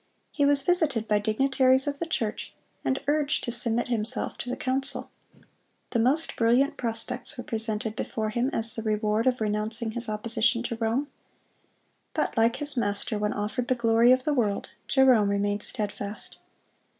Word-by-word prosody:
He 285 -2 +2
was 285 -1 +3
visited 295 -10 +1
by 210 -1 +3
dignitaries 260 +4 +3
of 285 -1 -3
the 335 - -3
church, 225 -9 -3 0.3
and 265 - +1
urged 295 0 +1
to 240 - -3
submit 235 0 0
himself 225 -2 -2
to 245 - -5
the 250 - -3
council. 270 +1 -1 0.8
The 235 - +1
most 275 +8 +2
brilliant 250 +6 +3
prospects 240 0 -3
were 245 - -5
presented 220 -1 -2
before 215 -1 -3
him 240 +4 0
as 225 0 0
the 225 - -3
reward 215 +1 0
of 255 -1 +2
renouncing 220 +2 -1
his 235 0 -4
opposition 225 +2 +1
to 240 -1 -3
Rome. 235 +6 -1 1.1
But - - -1
like 230 +1 +3
his 290 +2 +1
Master, 210 -1 -1
when 210 0 0
offered 215 +4 -3
the 255 - +2
glory 230 0 +4
of 255 0 +4
the 300 - +1
world, 215 -7 -1 0.2
Jerome 255 -6 +4
remained 205 0 0
steadfast. 205 -2 -5
235 Hz, 165 wpm, -27 LUFS, 215-260 Hz, 1.1 s, glory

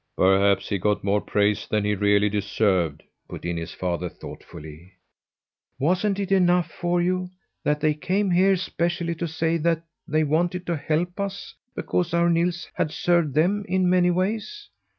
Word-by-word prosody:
"Perhaps 95 +1 +3
he 100 - -1
got 105 +2 0
more 100 +1 +1
praise 105 0 0
than 105 -1 0
he 105 - +1
really 105 +1 +3
deserved," 95 -6 0 0.3
put - - -8
in 85 0 -2
his 85 +1 -5
father 90 -1 -3
thoughtfully. 80 +5 -11 0.8
"Wasn't 185 +8 +1
it 195 -1 -3
enough 180 -3 +3
for 175 0 -1
you 180 +1 0 0.3
that 150 0 0
they 155 0 +3
came 185 +6 -1
here 190 +2 +4
specially 170 -2 -2
to 170 +1 -4
say 160 +1 0 0.5
they 155 +1 +1
wanted 175 +4 0
to 170 - -1
help 160 +5 -2
us 200 0 -4 0.2
because 175 -1 -1
our 170 0 +3
Nils 170 +1 0
had - - -1
served 170 -3 +1
them 190 +7 +2
in 185 0 +1
many 180 0 +4
ways? 220 - -2
170 Hz, 160 wpm, -24 LUFS, -, 0.8 s, here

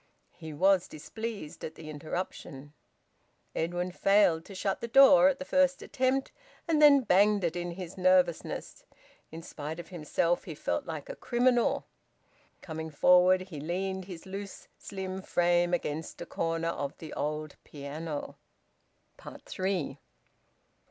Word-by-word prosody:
He 160 -2 -9
was 185 +4 +3
displeased 200 +2 -7
at 160 - -6
the 160 - -11
interruption. 150 -2 -6 0.8
Edwin 175 +2 -2
failed 185 -4 +3
to 195 - -11
shut 195 +1 -2
the 235 - -3
door 270 +2 +7
at 275 - -1
the 275 - -7
first 275 0 +2
attempt, 265 +1 0 0.4
and 315 -2 +2
then 285 -2 +8
banged 205 -1 +3
it 170 -1 0
in 175 0 -3
his 185 +1 -8
nervousness. 185 -2 +1 0.5
In 165 +1 -8
spite 155 +2 -6
of 175 - -9
himself 170 0 -1
he 160 - -7
felt 85 - -2
like 155 -3 -6
a - - -6
criminal. 245 0 +1 0.8
Coming 160 -1 -5
forward, 180 +4 +5
he 185 -5 -8
leaned 190 +4 -3
his 180 -2 -9
loose, 195 +1 -8
slim 190 -1 -6
frame 175 -1 +2
against 160 -2 -3
a - - -6
corner 165 0 -2
of 140 -4 -4
the 160 - -9
old 150 0 -3
piano. 150 +1 -6 1.1
THREE. 185 -7 -2
180 Hz, 140 wpm, -29 LUFS, 160-200 Hz, 1.1 s, then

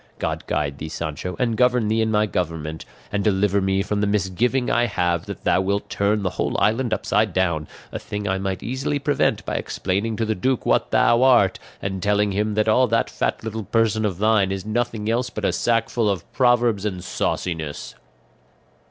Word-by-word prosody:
God - - -3
guide 70 -2 -2
thee, 80 - -5
Sancho, 80 +3 -4
and 115 -3 0
govern 125 -1 +3
thee 110 +1 +1
in 110 0 +1
thy 105 0 +3
government, 80 -5 -3 0.3
and 105 -1 -1
deliver 100 -1 +2
me 95 0 +1
from 105 +1 -1
the 105 - +1
misgiving 105 +6 0
I 120 0 +2
have 85 -4 -1
that - - -7
thou - - +3
wilt 100 +2 -2
turn 100 +1 +1
the 90 - 0
whole - - -1
island 115 +2 +1
upside 105 -2 +1
down, 85 -5 0 0.2
a - - -4
thing 105 0 -5
I 95 0 0
might 95 -1 -3
easily 130 +4 -2
prevent 145 0 0
by - - -2
explaining 100 +4 -2
to 115 - -1
the 110 - 0
duke 130 +6 -1
what - - +2
thou 120 +1 +4
art 120 -8 +4 0.2
and 95 -1 -3
telling 105 +1 +2
him 105 +2 -1
that 110 0 +1
all 125 +4 +4
that 115 0 0
fat - - -2
little 110 -1 -4
person 110 +1 +1
of 100 -5 -1
thine 105 -2 +3
is 95 0 -4
nothing 110 -1 -2
else 120 +2 0
but 105 - -4
a - - +1
sack 115 -1 +1
full 115 -3 0
of 95 -4 -2
proverbs 120 -4 +3
and 95 -4 -3
sauciness." 80 -4 -3
105 Hz, 200 wpm, -22 LUFS, 95-115 Hz, 0.3 s, thou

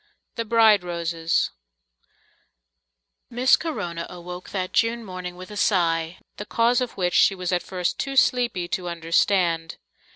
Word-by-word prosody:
The 230 - -3
Bride 220 -3 +5
Roses 170 -1 -1 1.8
Miss 250 +2 +4
Corona 175 - -4
awoke 180 0 -9
that 185 -2 -4
June 230 0 +1
morning 185 -2 -7
with 185 +2 -11
a - - -8
sigh, 170 -4 +1 0.2
the - - -5
cause 240 +2 +2
of 250 - -4
which 180 -2 0
she 195 - +4
was 180 -1 -3
at 180 -1 +1
first 180 -2 -3
too 275 0 -3
sleepy 245 -8 +2
to 185 -4 -3
understand. 170 0 +1
185 Hz, 140 wpm, -24 LUFS, 170-230 Hz, 1.8 s, Bride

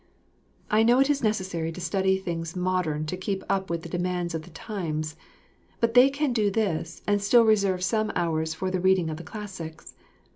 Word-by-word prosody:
I 215 - +5
know 240 +3 +5
it 275 +2 +4
is 285 - 0
necessary 185 -7 -1
to 165 - -8
study 190 +2 +1
things 170 -3 -4
modern 180 -4 0
to 155 - -3
keep 190 +1 -3
up 190 -1 0
with 170 -1 -2
the - - -6
demands 180 -1 -2
of 160 - -2
the 155 - -14
times; 160 -4 -4 0.6
but 230 0 +1
they 250 +2 +7
can 280 -1 -1
do 215 -3 +2
this 190 -6 -2
and 205 -1 +1
still 230 +3 +5
reserve 200 -4 +2
some 215 +2 +1
hours 160 -2 0
for 185 +3 -2
the 185 - 0
reading 185 -3 +3
of 155 - -5
the 170 - -8
classics. 180 -5 -8
185 Hz, 195 wpm, -26 LUFS, 165-210 Hz, 0.6 s, they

